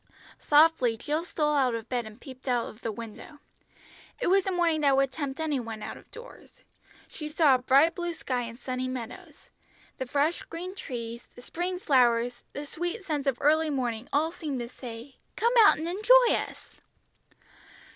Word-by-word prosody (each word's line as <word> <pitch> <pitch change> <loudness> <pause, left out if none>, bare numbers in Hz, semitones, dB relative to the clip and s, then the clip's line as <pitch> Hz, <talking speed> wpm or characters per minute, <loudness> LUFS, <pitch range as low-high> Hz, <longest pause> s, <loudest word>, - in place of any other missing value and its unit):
Softly 295 -6 +4
Jill 300 +7 -2
stole 300 -3 0
out 260 -5 +2
of 230 0 -6
bed 240 -3 -2
and 215 +2 -13
peeped 260 0 -12
out 245 -2 +1
of 215 - -12
the 225 - -2
window. 230 +6 -9 0.8
It - - -2
was 390 0 +3
a - - +1
morning 340 -3 +1
that 280 -2 +4
would 275 -1 +2
tempt 275 0 -5
any 305 -4 0
one 225 -3 -6
out - - -6
of - - -16
doors. 480 +1 -14 0.4
She 305 -1 -7
saw 300 -2 +4
a - - +5
bright 275 +6 +4
blue 345 0 -4
sky 250 -5 -2
and 230 -1 -7
sunny 255 0 -3
meadows. 255 -3 -8 0.5
The 260 - -3
fresh 290 +6 +1
green 360 +3 -7
trees, 235 - -7
the 245 - -13
spring 360 +5 -3
flowers, 245 -5 +2
the 290 - -6
sweet 350 +7 -4
scents 295 -4 -2
of 265 -3 +1
early 310 +2 +3
morning 245 -4 -2
all 310 +3 +1
seemed 300 -6 -4
to 235 - -6
say, 245 +1 -10 0.2
"Come 470 +2 +1
out - - +6
and 320 +2 -4
enjoy 465 +7 +5
us!" - - -5
280 Hz, 185 wpm, -28 LUFS, 245-325 Hz, 0.8 s, out